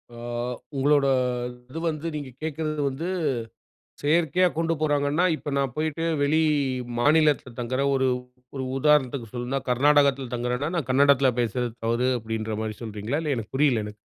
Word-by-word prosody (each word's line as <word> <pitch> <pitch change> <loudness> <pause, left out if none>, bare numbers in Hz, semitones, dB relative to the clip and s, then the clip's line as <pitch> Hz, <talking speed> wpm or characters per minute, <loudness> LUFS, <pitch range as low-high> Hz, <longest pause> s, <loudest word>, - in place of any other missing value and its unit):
அ, - - -11 0.6
உங்களோட 140 0 +3 0.6
இது 160 - -6
வந்து 155 +1 -4
நீங்க 145 -3 -5
கேட்கிறது 155 -1 -2
வந்து 145 +6 -5 0.9
செயற்கையா 170 +4 +3
கொண்டு 165 0 +1
போறாங்கன்னா, 145 +2 +1
இப்ப 150 - -6
நான் 135 -3 0
போயிட்டு 155 +1 -2 0.2
வெளி 155 +3 +3 0.6
மாநிலத்தில 145 -2 +3
தங்குற 130 +3 -1
ஒரு 130 -1 +2 0.5
ஒரு 130 - -3
உதாரணத்துக்கு 135 -5 +2
சொல்லணும்னா, 125 +2 -2
கர்நாடகத்துல 140 -1 +3
தங்குறன்னா, 125 +5 -1
நான் 150 -7 -2
கன்னடத்துல 135 0 +5
பேசறது 120 0 -1
தவறு 120 +3 +1
அப்படின்ற 110 -1 -4
மாதிரி 110 -1 -3
சொல்கிறீங்களா? 110 +6 -3
இல்ல 150 -2 0
எனக்கு 115 0 -6
புரியல 135 -7 +3
எனக்கு. 105 0 -9
140 Hz, 140 wpm, -25 LUFS, 125-150 Hz, 0.9 s, கன்னடத்துல